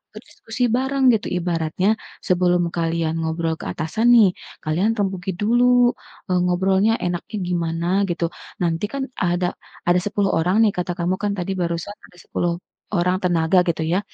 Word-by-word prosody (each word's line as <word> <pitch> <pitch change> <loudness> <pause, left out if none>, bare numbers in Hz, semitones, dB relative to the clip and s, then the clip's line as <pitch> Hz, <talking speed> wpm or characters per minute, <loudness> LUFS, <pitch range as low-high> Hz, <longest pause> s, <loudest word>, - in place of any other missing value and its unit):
berdiskusi 225 +2 -4
bareng, 265 0 +3
gitu. 220 - -1
Ibaratnya, 175 +3 0 0.3
sebelum 175 -1 +2
kalian 165 -1 -1
ngobrol 160 0 -1
ke - - -6
atasan, 175 +9 -1
nih, 210 -6 +6 0.3
kalian 185 +9 +1
rembuki 190 -2 -2
dulu, 245 +4 +4 0.4
eee, 180 - +3
ngobrolnya 190 +4 +2
enaknya 175 +5 -3
gimana, 170 -1 -2 0.2
gitu. 170 -1 -1 0.3
Nanti, 165 +2 0
kan, 275 +2 -3 0.2
ada 175 -1 0 0.3
ada 175 +1 +4
10 200 0 0
orang, 180 +7 +3
nih, 215 - +4
kata 180 0 -3
kamu, 180 +2 -1
kan, 205 -1 0
tadi 180 +2 -3
barusan 170 0 -2 0.2
ada 180 - -20
10 175 -1 -1 0.4
orang 180 0 +2
tenaga 175 0 +2
gitu, 165 -1 0
ya. 190 - +3
180 Hz, 155 wpm, -21 LUFS, 170-205 Hz, 0.4 s, nih